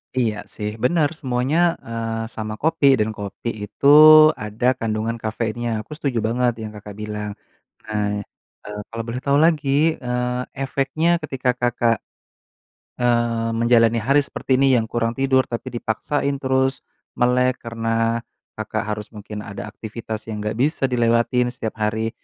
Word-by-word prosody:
Iya 115 -4 +1 0.2
sih. 105 0 -3
Benar 150 +2 +3
semuanya, 130 +2 0 0.3
eee, 115 -1 -3
sama 110 -1 -4
kopi 155 -2 +2
dan 110 +1 +1
kopi 100 +3 -5 0.2
itu 110 +6 -1 0.6
ada 105 +3 -4
kandungan 110 +1 -2
kafeinnya. 115 +2 -2
Aku - - -26
setuju 135 -7 -1
banget 120 +1 +1
yang 110 - -6
Kakak 105 -1 -10
bilang. 105 0 -5 0.5
Nah, 105 -1 -2 0.4
eee, 105 0 -6
kalau 115 0 -5
boleh 120 +2 -3
tahu 140 0 +3
lagi, 155 0 +2
eee, 125 0 -2
efeknya 140 +5 0
ketika 135 -4 0
Kakak, 120 -2 +1 1.0
eee, 120 -1 +1
menjalani 115 -1 +4
hari 140 +6 +3
seperti 130 -2 -1
ini 135 0 +4
yang 115 - 0
kurang 115 -1 -1
tidur, 130 -1 +3
tapi 120 +2 -5
dipaksain 140 +5 -1
terus 130 0 +1 0.4
melek 125 +1 +2
karena 115 0 -1 0.4
Kakak 110 0 -3
harus 105 0 -4
mungkin 105 0 -7
ada 100 +1 -7
aktivitas 110 0 -7
yang 105 -1 -4
enggak 105 +1 -3
bisa 140 +4 0
dilewatin 120 0 +2
setiap 115 -2 -5
hari. 110 +1 -1
115 Hz, 145 wpm, -21 LUFS, 110-130 Hz, 1.0 s, menjalani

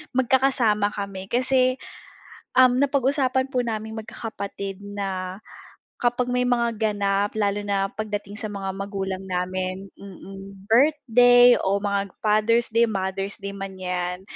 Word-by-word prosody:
magkakasama 250 -5 +2
kami 200 -2 -5
kasi, 255 +2 +2 0.8
um, 255 -1 +5
napag-usapan 270 -1 +1
po 250 -2 0
naming 220 0 -4
magkakapatid 200 -3 -6
na, 195 -2 -4 0.6
kapag 245 +1 0
may 250 0 +1
mga 235 -2 +1
ganap, 205 -2 0
lalo 205 -2 0
na 195 -1 0
pagdating 205 -1 -5
sa 220 - -6
mga 195 -1 -4
magulang 195 -1 -4
namin, 185 +1 -3
mm, 195 +1 -11
birthday 245 -2 +6
o 200 +1 0
mga 200 -1 -2
Father's 215 +2 +2
Day, 230 +1 +3
Mother's 195 -2 -3
Day 200 - -4
man 195 -1 -6
yan, 180 0 -3
205 Hz, 125 wpm, -24 LUFS, 195-245 Hz, 0.8 s, birthday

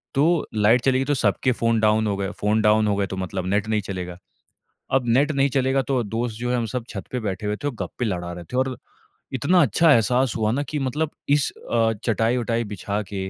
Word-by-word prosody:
तो 155 +4 +2
लाइट 110 +4 +4
चलेगी 135 0 +2
तो 145 - +1
सबके 125 0 +1
फ़ोन 115 -1 +1
डाउन 110 0 +3
हो 100 -1 -1
गए। 100 -1 -2
फ़ोन 105 +1 +2
डाउन 105 0 +4
हो 100 - +2
गए 100 -1 0
तो 95 - -6
मतलब 95 0 -3
नेट 100 +2 0
नहीं 110 -1 +1
चलेगा। 90 -3 -6 0.8
अब 130 -2 +2
नेट 140 +6 +3
नहीं 140 -1 +2
चलेगा, 135 +1 +1
तो 130 -2 0
दोस्त 115 +1 -3
जो 120 +1 -2
है 125 - +1
हम 120 -2 -1
सब 120 +2 -4
छत 100 - -6
पे 125 - -1
बैठे 105 -2 -4
हुए 105 0 -1
थे 145 - -6
और 140 - -5
गप्पे 125 - -4
लड़ा 90 -5 -3
रहे 90 0 -8
थे 125 - -6
और 130 0 0 0.6
इतना 170 +8 +3
अच्छा 155 +6 +4
एहसास 125 +1 +3
हुआ 110 -2 +1
ना 140 +4 0
कि 150 +1 -4
मतलब 145 +3 -1 0.2
इस 145 -1 +3 0.2
अ, 115 -1 +3
चटाई-वटाई 115 +1 0
बिछा 105 0 -3
के - - -4
115 Hz, 230 wpm, -23 LUFS, 105-130 Hz, 0.8 s, लाइट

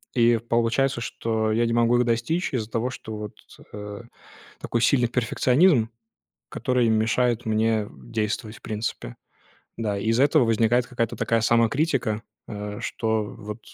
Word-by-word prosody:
и 120 -1 +4
получается, 120 +3 +1
что 110 -1 -2
я 115 +1 +2
не 115 - -1
могу 120 +1 +3
их 125 - +3
достичь 120 +9 -1
из-за 115 -3 -2
того, 120 +3 -1
что 110 -3 -7
вот, 105 -1 -7 0.4
э, 105 +1 -7 0.6
такой 120 - -1
сильный 120 0 +3
перфекционизм, 125 +2 +3 0.6
который 125 -2 0
мешает 115 +2 +1
мне 110 -1 +1
действовать, 105 - -4
в - - -19
принципе. 105 - -4 0.6
Да, 105 -3 -1
из-за 115 +6 +2
этого 145 -2 +4
возникает 115 +2 +2
какая-то 115 -2 -2
такая 115 - +1
самокритика, 115 0 +1 0.3
э, 105 -1 -6
что 110 -1 -1
вот 105 +1 -8
115 Hz, 140 wpm, -24 LUFS, 110-120 Hz, 0.6 s, и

